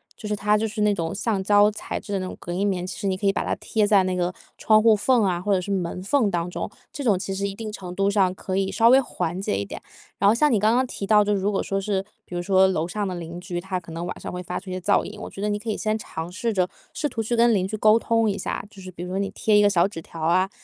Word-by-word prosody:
就 215 - -8
是 210 - 0
它 210 +1 +2
就 220 +1 0
是 215 0 -4
那 210 0 +3
种 165 -4 -3
橡 200 0 -1
胶 205 +1 +5
材 215 - -5
质 205 - -7
的 195 - 0
那 185 - -3
种 185 - -6
隔 175 - -7
音 195 +3 0
棉， 180 -3 -1
其 185 - -6
实 200 - -2
你 190 - +1
可 195 +2 -5
以 - - +5
把 - - -2
它 - - 0
贴 215 -2 0
在 205 -2 +5
那 185 0 -1
个 180 0 -1 0.2
窗 215 -1 +4
户 225 -1 +6
缝 235 +3 +3
啊 180 -3 +1
或 205 +2 +1
者 185 - +2
是 200 - -5
门 180 -2 -2
缝 225 +1 +2
当 170 0 -1
中， - - -4 0.2
这 285 - -6
种 210 -7 +3
其 190 +1 -4
实 200 +1 -1
一 195 - -6
定 220 -1 -6
程 180 -4 -7
度 195 +1 +2
上 195 -3 +2
可 185 0 -4
以 195 0 0
稍 230 0 +4
微 260 +2 +7
缓 180 -7 -3
解 100 - -1
一 100 - -2
点。 - - -8 0.4
然 200 - +4
后 205 - +6
像 295 +6 +3
你 225 - +4
刚 215 +3 +3
刚 255 +2 +3
提 200 - -5
到， 210 0 +5
就 205 0 +1
是 - - 0
如 200 +2 +1
果 195 - 0
说 195 0 -2
是， 195 -1 -1 0.2
比 - - -12
如 175 - -1
说 190 +1 +4
楼 165 -3 -1
上 205 +3 -2
的 185 - -3
邻 170 0 -6
居， 175 -1 -5
他 185 0 -3
可 165 -1 -13
能 165 +1 -5
晚 175 - -5
上 - - -6
会 180 - -4
发 180 0 -4
出 185 0 -9
一 - - -3
些 185 - -3
噪 205 +3 +2
音， 210 0 -8
我 - - -6
觉 - - -12
得 210 - 0
你 205 0 -1
可 225 +2 -6
以 215 - -1
先 215 -1 0
尝 170 -6 -6
试 230 +5 -2
着 185 -4 +1 0.2
试 300 - -2
图 230 - -3
去 225 +2 -1
跟 235 0 +4
邻 190 -2 +1
居 215 - -4
沟 215 +1 +5
通 230 -1 +1
一 200 - 0
下， - - -4
就 200 -2 -14
是 185 - -9
比 175 -1 -8
如 180 - -6
说 190 +1 -2
你 195 0 -1
贴 210 +1 +1
一 - - +6
个 205 - +5
小 180 -2 +3
纸 180 -5 -8
条 165 - -11
啊， 175 +4 +2
195 Hz, 360 characters per minute, -24 LUFS, 185-215 Hz, 0.4 s, 微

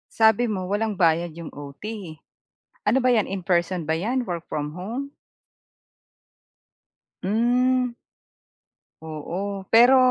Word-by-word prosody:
Sabi 220 +1 +5
mo 190 -5 -3
walang 210 +1 0
bayad 170 -2 +2
yung 165 0 -8
OT. 140 -1 -10 1.1
Ano 230 +6 +4
ba 255 - +4
'yan, 220 -4 +3
in 190 -1 -4
person 175 0 +1
ba 160 +1 -1
'yan, 245 +8 0
work 175 -7 -5
from 150 -1 -3
home? 245 +9 -4 2.1
Hmm. 245 +4 +2 1.1
Oo. 185 +6 -5
Pero 245 +3 +8
195 Hz, 115 wpm, -24 LUFS, 170-235 Hz, 2.1 s, Pero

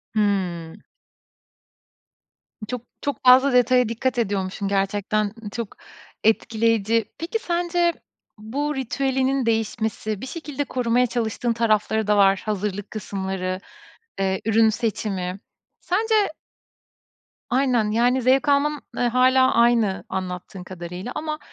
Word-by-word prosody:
Hımm. 185 -6 -1 1.9
Çok 250 0 -4 0.2
çok 285 -4 -3
fazla 260 +2 +6
detaya 250 -1 +4
dikkat 245 +2 -1
ediyormuşsun 200 -2 -2
gerçekten, 200 +1 0 0.2
çok 230 -2 -5 0.5
etkileyici. 225 0 +2
Peki 345 +8 -3
sence 345 -2 0 0.4
bu 280 +8 -3
ritüelinin 265 0 0
değişmesi 220 -2 -1
bir - - -5
şekilde 295 -1 -4
korumaya 250 -1 +1
çalıştığın 235 0 -1
tarafları 220 -1 +1
da 210 0 +3
var. 195 -1 +4
Hazırlık 205 -1 -3
kısımları, 190 -3 -3 0.6
eee, 190 -1 0
ürün 225 0 +4
seçimi. 200 -5 -2 0.4
Sence 440 +5 +1 1.3
Aynen, 245 -4 +2
yani, 245 +4 +2
zevk 265 +4 +3
alman 290 +1 +2
hâlâ 255 +2 +4
aynı 235 -4 +3
anlattığın 180 0 -5
kadarıyla 180 +4 -7
ama 305 0 -3
225 Hz, 105 wpm, -23 LUFS, 200-260 Hz, 1.9 s, fazla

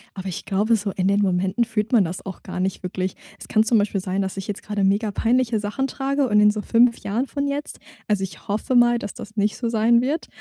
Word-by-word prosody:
Aber 190 0 -6
ich 180 - -5
glaube 210 +4 +2
so, 205 -1 -2
in 185 0 -1
den 200 +1 +3
Momenten 190 +4 +1
fühlt 220 -1 -2
man 230 -6 +5
das 180 +2 -5
auch 190 -2 -7
gar - - -6
nicht 190 +1 -1
wirklich. 185 0 -3 0.2
Es - - -9
kann 215 - +3
zum 225 +1 +3
Beispiel 205 -1 +1
sein, 190 +1 -1
dass 190 0 -5
ich 195 - -5
jetzt 205 -1 -5
gerade 210 -2 -2
mega-peinliche 225 +4 +1
Sachen 210 +6 -2
trage 275 0 -1
und 210 -1 +3
in 210 0 +6
so 210 0 -1
5 235 0 +4
Jahren 235 +7 -2
von 285 0 -2
jetzt 285 +1 -4 0.3
also, 205 -2 +1
ich 190 - -8
hoffe 215 +6 -1
mal, 240 0 +5
dass 205 -4 -6
das 215 +1 -10
nicht 210 0 +1
so 235 - -2
sein 230 +1 +3
wird, 290 +6 -2
210 Hz, 250 wpm, -23 LUFS, 195-235 Hz, 0.3 s, in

